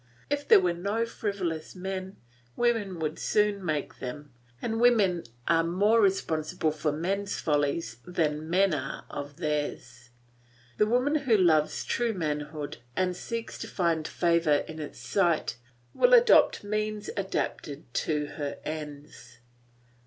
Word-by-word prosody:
If 290 Hz, 0 st, -1 dB
there -, -, +8 dB
were 180 Hz, -2 st, +1 dB
no 200 Hz, +6 st, -1 dB
frivolous 195 Hz, -9 st, -4 dB
men, 190 Hz, +1 st, -5 dB, 0.4 s
women 225 Hz, -6 st, +1 dB
would 155 Hz, -1 st, -3 dB
soon 210 Hz, -2 st, +1 dB
make 155 Hz, -4 st, -2 dB
them, 140 Hz, +2 st, -7 dB, 0.3 s
and 225 Hz, -, -2 dB
women 205 Hz, -8 st, +4 dB, 0.2 s
are 165 Hz, 0 st, +4 dB
more 205 Hz, +7 st, +3 dB
responsible 165 Hz, -4 st, +1 dB
for 155 Hz, 0 st, -1 dB
men's 195 Hz, +6 st, -2 dB
follies 145 Hz, -4 st, 0 dB
than 155 Hz, -3 st, -1 dB
men 190 Hz, +1 st, +3 dB
are 135 Hz, -2 st, -4 dB
for 145 Hz, +2 st, -7 dB
theirs. 145 Hz, -6 st, -3 dB, 0.7 s
The 210 Hz, -, +4 dB
woman 250 Hz, +6 st, +2 dB
who 265 Hz, -7 st, +3 dB
loves 160 Hz, -5 st, +3 dB
true 235 Hz, -1 st, 0 dB
manhood 150 Hz, -3 st, -3 dB, 0.2 s
and 180 Hz, -1 st, 0 dB
seeks 230 Hz, +5 st, -5 dB
to -, -, -5 dB
find 165 Hz, -4 st, 0 dB
favour 170 Hz, -4 st, +2 dB
in 160 Hz, 0 st, -8 dB
its 150 Hz, -, -7 dB
sight 170 Hz, -, 0 dB, 0.4 s
will -, -, +6 dB
adopt 470 Hz, -, +5 dB
means 215 Hz, 0 st, -2 dB
adapted 190 Hz, -6 st, -3 dB
to 150 Hz, +2 st, 0 dB
her 145 Hz, -2 st, -3 dB
ends. 150 Hz, -3 st, -7 dB
175 Hz, 135 wpm, -28 LUFS, 150-205 Hz, 0.7 s, there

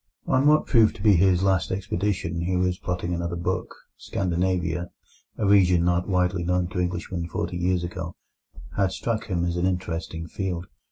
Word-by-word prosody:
On 130 Hz, +2 st, +3 dB
what 155 Hz, +1 st, +5 dB
proved 115 Hz, -3 st, +4 dB
to -, -, -9 dB
be 105 Hz, -2 st, +6 dB
his 95 Hz, 0 st, +4 dB
last 95 Hz, -7 st, +2 dB
expedition, 95 Hz, -3 st, -2 dB
he 90 Hz, +2 st, 0 dB
was 90 Hz, 0 st, 0 dB
plotting 90 Hz, 0 st, -2 dB
another 85 Hz, 0 st, -2 dB
book. 85 Hz, -, -3 dB, 0.2 s
Scandinavia, 90 Hz, -2 st, -1 dB, 0.5 s
a 110 Hz, -, 0 dB
region 90 Hz, -4 st, +5 dB
not 90 Hz, +2 st, +1 dB
widely 90 Hz, -1 st, +1 dB
known 90 Hz, 0 st, 0 dB
to 90 Hz, -, -3 dB
Englishmen 90 Hz, -1 st, -2 dB
forty 85 Hz, +1 st, -3 dB
years 90 Hz, 0 st, +1 dB
ago, 85 Hz, 0 st, -5 dB, 0.6 s
had 95 Hz, -1 st, +2 dB
struck 115 Hz, +2 st, -2 dB
him 85 Hz, -4 st, 0 dB
as 85 Hz, 0 st, -1 dB
an 90 Hz, +1 st, +1 dB
interesting 85 Hz, -2 st, -3 dB
field. 90 Hz, -2 st, -3 dB
90 Hz, 170 wpm, -25 LUFS, 85-95 Hz, 0.6 s, be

